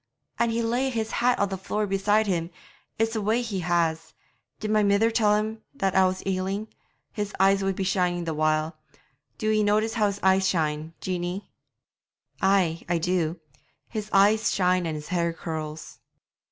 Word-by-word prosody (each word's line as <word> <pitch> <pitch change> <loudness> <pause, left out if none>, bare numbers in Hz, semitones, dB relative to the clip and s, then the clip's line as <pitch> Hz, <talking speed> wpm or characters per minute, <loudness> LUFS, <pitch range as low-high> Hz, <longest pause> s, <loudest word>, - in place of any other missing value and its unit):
'An' 235 - +3
he'd 230 +1 0
lay 245 +4 0
his 225 -3 -2
hat 245 +1 +2
on 200 - +1
the 190 -1 -4
floor 210 +3 -2
beside 205 +2 +2
him; 170 -4 -1 0.5
it's 225 +1 0
a 220 - -1
way 220 +4 +1
he 210 -5 -3
has. 165 -2 0 0.4
Did 215 -1 -3
my 215 0 +4
mither 205 +3 +3
tell 215 -2 +3
him 215 +1 -2
that 195 -7 0
I 190 -1 +5
was 185 0 -3
ailing? 195 +3 -2 0.4
His 205 0 -4
eyes 195 +1 +4
would 195 -1 0
be 195 - -2
shining 180 -2 0
the 165 -1 -2
while. 155 +1 0 0.6
Do 215 -1 0
ye 215 0 +3
notice 215 +2 +2
how 215 -3 +2
his 200 0 -3
eyes 190 0 +4
shine, 155 -2 -1
Jeanie?' 180 +1 -4 0.9
'Ay, 185 -4 +2 0.2
do 170 -1 0
I; - - -29 0.3
his 215 -2 -5
eyes 210 +3 +4
shine 180 -2 +2
and 160 - -3
his 150 0 -7
hair 170 -2 0
curls.' 155 -2 -6
195 Hz, 180 wpm, -26 LUFS, 175-215 Hz, 0.9 s, I